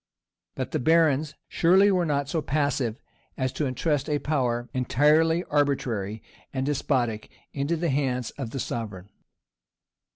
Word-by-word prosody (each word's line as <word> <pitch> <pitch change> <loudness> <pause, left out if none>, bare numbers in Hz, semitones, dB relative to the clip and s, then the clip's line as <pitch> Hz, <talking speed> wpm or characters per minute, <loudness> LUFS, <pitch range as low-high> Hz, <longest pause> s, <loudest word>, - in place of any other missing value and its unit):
But - - -4
the - - 0
barons 155 0 +3
surely 190 +4 +4
were 180 -3 +1
not 140 -2 0
so 160 +2 -1
passive 140 -5 -1 0.4
as 130 -1 -1
to 150 - -1
intrust 145 +2 -1
a 150 - +2
power, 125 -5 -1
entirely 150 +6 +3
arbitrary 120 - -1 0.3
and 130 -1 -2
despotic, 130 -6 -1 0.2
into 140 +4 -1
the 170 +1 -1
hands 130 -3 -1
of 135 -5 -6
the 135 - -5
sovereign. 105 -6 -5
140 Hz, 135 wpm, -26 LUFS, 125-155 Hz, 0.4 s, surely